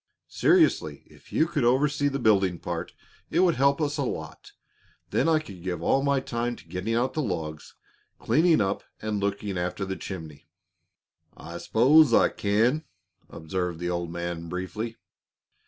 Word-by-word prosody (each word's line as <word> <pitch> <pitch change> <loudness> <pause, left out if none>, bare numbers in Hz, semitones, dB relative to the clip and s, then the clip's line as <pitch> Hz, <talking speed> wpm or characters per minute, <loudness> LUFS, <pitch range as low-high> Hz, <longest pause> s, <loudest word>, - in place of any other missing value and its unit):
Seriously, 355 -3 +2
if - - -20
you 160 - +3
could 155 -5 -1
oversee 145 +4 +2
the 140 -1 -1
building 100 -7 +3
part, - - -5 0.4
it 170 - +2
would 180 -2 +4
help 140 +1 +2
us 150 -1 -1
a - - +1
lot. 125 - -6 0.6
Then - - +2
I 160 - +4
could 100 - -7
give 90 -2 -4
all 135 - +3
my 140 -1 +2
time 120 -1 -3
to - - -16
getting 95 +6 -2
out 125 +2 0
the 155 - -1
logs, 80 - -5 0.4
cleaning 160 -4 +3
up, 95 0 -1 0.2
and 110 -1 -2
looking 100 -1 -2
after 90 +3 -2
the 95 0 -4
chimney." 80 -8 -8 0.9
"I 85 +1 -8
s'pose 145 +7 +5
I - - +5
can," 115 +9 +1 0.5
observed 90 +1 -3
the 85 +1 -3
old 85 -1 -2
man, 85 -1 -5
briefly. 105 +6 -4
105 Hz, 160 wpm, -26 LUFS, 90-140 Hz, 0.9 s, s'pose